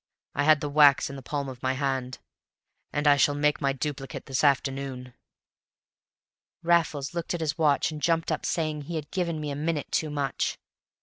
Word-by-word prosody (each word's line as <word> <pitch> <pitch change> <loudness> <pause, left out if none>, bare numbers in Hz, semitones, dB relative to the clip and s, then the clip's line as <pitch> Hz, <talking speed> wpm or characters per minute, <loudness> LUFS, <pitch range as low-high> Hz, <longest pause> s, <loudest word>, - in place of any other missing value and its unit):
I - - 0
had 155 -1 +5
the 145 - -2
wax 145 -1 +5
in - - -8
the 135 - -8
palm 140 +2 -3
of 130 -2 -8
my 130 0 0
hand, 130 -2 -2 0.7
and 145 +1 -2
I 145 -1 +6
shall 145 0 +3
make 150 0 +1
my 140 - +2
duplicate 135 0 -5
this 135 -1 -1
afternoon." 135 -2 0 1.5
Raffles 165 -4 +1
looked 170 0 -2
at - - -4
his 150 -3 -1
watch 155 -1 +2
and 155 -1 -7
jumped 165 0 +1
up 155 - -2
saying 155 -2 -1
he 170 - -5
had 150 -2 -5
given 170 -4 -1
me 150 -1 -3
a - - -3
minute 150 0 -2
too 155 - 0
much. 140 -3 -2
145 Hz, 190 wpm, -27 LUFS, 135-155 Hz, 1.5 s, I